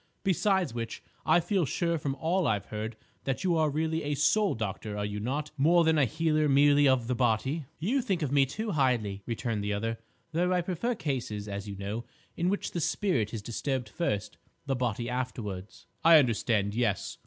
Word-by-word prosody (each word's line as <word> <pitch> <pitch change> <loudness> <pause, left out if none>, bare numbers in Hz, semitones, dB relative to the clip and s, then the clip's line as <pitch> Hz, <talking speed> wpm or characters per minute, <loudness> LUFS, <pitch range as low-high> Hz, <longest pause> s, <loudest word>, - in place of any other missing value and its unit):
Besides 190 - +2
which, 115 -1 -5 0.2
I 160 +2 +6
feel 175 +2 +1
sure 170 +2 0
from 140 -2 -2
all 165 +4 +1
I've 105 -2 0
heard, 110 +1 -5 0.3
that 135 -1 -1
you 180 -2 +2
are 155 -1 +3
really 160 +2 -1
a 145 0 -1
soul 195 +9 +3
doctor, 105 -1 -4
are 105 - -1
you 105 0 -4
not, 145 +7 -2
more 170 +5 +5
than 160 -1 +3
a 140 - +5
healer 155 +2 +1
merely 145 +1 +5
of 130 -3 +3
the 125 - 0
body?" 130 +5 0
"You 235 - +1
think 195 -9 -1
of 140 - -1
me 140 -1 +4
too 215 - -3
highly," 120 - +1
returned 115 -2 -2
the 105 0 -1
other; 115 +2 -2 0.3
"though 175 +3 +1
I 180 - +2
prefer 185 +8 -2
cases, 120 - -3
as 100 0 -5
you 100 - -5
know, 100 +4 -4 0.3
in 175 +2 +1
which 200 - -2
the 170 - -2
spirit 140 - 0
is 110 -3 -5
disturbed 125 +1 -2
first, 105 -7 -2 0.3
the 135 - 0
body 120 -2 -1
afterwards." 115 -6 -5 0.2
"I 165 0 +9
understand, 110 -6 +2
yes. 110 -4 -1
135 Hz, 195 wpm, -29 LUFS, 110-165 Hz, 0.3 s, I